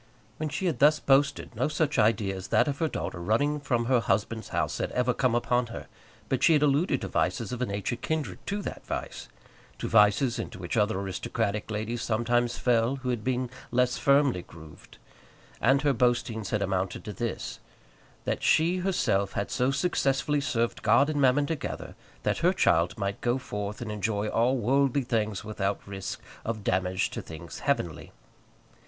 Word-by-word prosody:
When 155 0 -2
she 190 - -3
had 170 - 0
thus 150 +2 +5
boasted 140 -2 +2
no 125 +5 +1
such 155 0 0
idea 105 -3 +2
as 95 -1 -7
that - - +3
of 140 -1 -2
her 160 - +2
daughter 85 - -4
running 145 +11 +1
from 120 -4 0
her 125 0 +3
husband's 110 0 -1
house - - -1
had - - -2
ever 125 0 +2
come 125 -1 +1
upon 120 0 +1
her; 115 - -7 0.4
but - - -1
she 165 - +6
had 150 -1 +4
alluded 145 +5 +2
to - - -3
vices - - -1
of 125 0 -4
a 125 - 0
nature 100 +4 -2
kindred 155 +4 -3
to 200 0 -2
that - - -6
vice, - - -5 0.5
to - - -4
vices 110 +3 +4
into - - -5
which 90 +2 -4
other 105 -2 +2
aristocratic 100 +3 -2
ladies 110 +2 -3
sometimes 120 +1 +1
fell, 120 +1 +2
who 130 -2 -5
had 120 -3 -1
been 125 0 -1 0.2
less 125 0 +1
firmly 140 -8 +3
grooved; 80 -3 -14 0.6
and 135 +1 +4
her 145 -2 +3
boastings 120 -3 0
had 105 -2 0
amounted 95 -1 -2
to 105 - -5
this, 115 +4 -4 0.7
that - - -1
she 170 +3 +3
herself 175 - 0
had 100 - -2
so 125 0 +1
successfully 140 -1 +1
served 120 -4 -1
God 120 +7 +4
and 145 -2 0
Mammon 135 +2 +4
together, 155 -3 -4 0.3
that - - 0
her - - +3
child 85 +3 +2
might 100 -1 -3
go 120 +1 +1
forth 105 -4 -5
and 110 -3 -4
enjoy 105 0 -1
all 125 +4 +2
worldly 135 +3 +2
things 110 -4 -1
without 100 -2 -2
risk 95 -1 -5 0.2
of 110 -2 -4
damage 95 0 0
to - - -4
things 80 +1 -9
heavenly. 85 - -2
120 Hz, 180 wpm, -28 LUFS, 105-140 Hz, 0.7 s, she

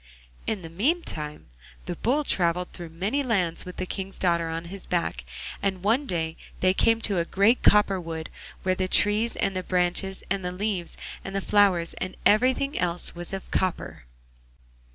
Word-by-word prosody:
In 210 -5 -2
the 165 - -7
meantime 175 - -2 0.4
the - - -3
Bull 280 +6 +1
travelled 180 -6 0
through 170 -2 -5
many 195 - -1
lands 190 -10 0
with 180 - -8
the 185 - -2
King's 195 +1 -4
daughter 170 -2 +1
on 165 +1 -4
his 190 +2 -4
back, 165 - -1 0.4
and 190 -2 -1
one 240 +8 +2
day 160 -2 -2 0.2
they 185 0 +4
came 225 +3 +3
to 200 -5 +1
a - - +2
great 200 +8 +3
copper 200 -2 +5
wood, 160 -1 -6 0.3
where 185 - +2
the 185 0 -1
trees, 210 +4 +3
and 195 -1 0
the 185 - 0
branches, 185 +1 0
and 195 0 -1
the 180 - -2
leaves, 185 -2 -3 0.3
and 195 - -6
the - - +2
flowers, 195 -4 +3
and 185 0 -4
everything 260 +6 +3
else 175 -1 0
was 175 0 -7
of 195 -1 -6
copper. 185 - -1
185 Hz, 175 wpm, -26 LUFS, 175-205 Hz, 0.4 s, copper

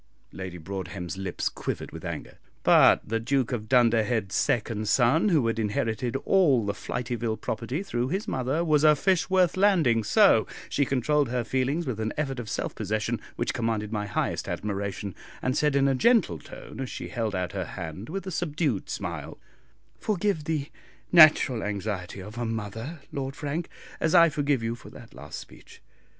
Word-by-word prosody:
Lady 95 -2 -7
Broadhem's 90 -1 -5
lips 95 -2 -3
quivered - - -4
with - - -9
anger; - - -6 0.2
but - - +6
the 115 +1 0
Duke 130 +2 0
of 110 -3 -4
Dunderhead's 115 -4 +3
second 110 -2 0
son, 135 - +4
who 155 -9 +3
had 115 0 0
inherited 110 +3 -1
all 145 - +4
the 100 - -1
Flityville 120 0 -3
property 120 - -3
through 120 -10 -2
his 190 +9 -2
mother, 135 +6 -1
was 155 -2 +3
a 155 -1 +7
fish 185 +4 +1
worth 185 -3 +3
landing, 170 - +3
so - - +5 0.2
she 140 - +1
controlled 140 +2 +1
her 125 0 -1
feelings 130 +8 0
with 125 -6 -3
an 110 0 -2
effort 135 -4 -2
of 115 -3 -6
self - - -3
possession 110 +2 -2
which 120 - -1
commanded 115 -4 -1
my 105 -2 -2
highest 105 - -2
admiration, 100 -1 -3 0.3
and 130 +1 -1
said 150 -1 +2
in 140 0 +4
a 135 - +3
gentle 165 - +3
tone - - -11
as 130 -2 -3
she - - -6
held 110 -5 -2
out 90 -1 -2
her 95 -2 -3
hand 85 - -7
with 195 +4 -4
a 190 - -4
subdued 155 - -1
smile, - - -5 0.6
"Forgive 200 -6 0
the 150 -3 -2 0.4
natural 155 -8 +7
anxiety 100 -2 -4
of 105 +5 -8
a 120 - -1
mother, 115 +8 -5
Lord 135 -1 -4
Frank, 155 +3 -3 0.3
as 160 +2 +1
I 170 -1 +8
forgive 145 -4 0
you 115 +1 -1
for 120 - -11
that - - -13
last 75 -1 -8
speech." - - -13
120 Hz, 175 wpm, -27 LUFS, 105-150 Hz, 0.6 s, I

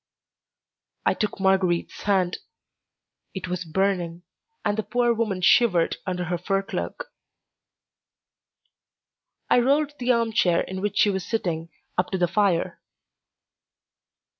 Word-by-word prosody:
I - - +4
took 210 -2 -3
Marguerite's 190 -3 +1
hand. 190 -3 +1 1.0
It 185 -1 -4
was 180 0 -3
burning, 175 0 -1 0.4
and 205 - +1
the 220 - 0
poor 240 +1 +1
woman 215 -5 -1
shivered 180 -4 +4
under 180 -1 -2
her 175 0 -2
fur 195 +2 0
cloak. - - -5 2.4
I - - +4
rolled 285 +4 +2
the 250 0 +2
arm 230 -2 +1
chair 175 -5 +3
in 190 0 -5
which 205 0 -2
she 205 - +4
was 190 -2 -2
sitting 170 -7 -2 0.3
up 180 - +1
to 190 - -1
the 175 -1 +2
fire. 195 -2 0
190 Hz, 125 wpm, -25 LUFS, 180-220 Hz, 2.4 s, I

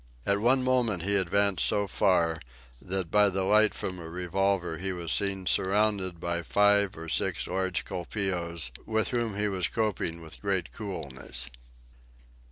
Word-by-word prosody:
At 100 0 +2
one 130 +4 +3
moment 120 -8 +1
he 100 +2 +1
advanced 100 +1 +2
so 100 - +3
far, 85 -4 +2 0.4
that 95 -2 -2
by 105 -1 +5
the 95 0 0
light 105 +2 +4
from 90 -1 -5
a 80 -1 -8
revolver 90 -1 -1
he 95 +1 -2
was 85 -2 -4
seen 100 -2 0
surrounded 95 -2 +2
by 85 0 -2
five 100 +2 +3
or 80 0 -7
six - - 0
large 95 -2 -2
colpeos, 85 - -3 0.2
with 110 0 +1
whom 115 -5 -2
he 105 0 0
was 95 -4 -1
coping 105 -7 -2
with 80 - -13
great 100 -3 -1
coolness. 75 - -4
95 Hz, 155 wpm, -28 LUFS, 85-105 Hz, 0.4 s, by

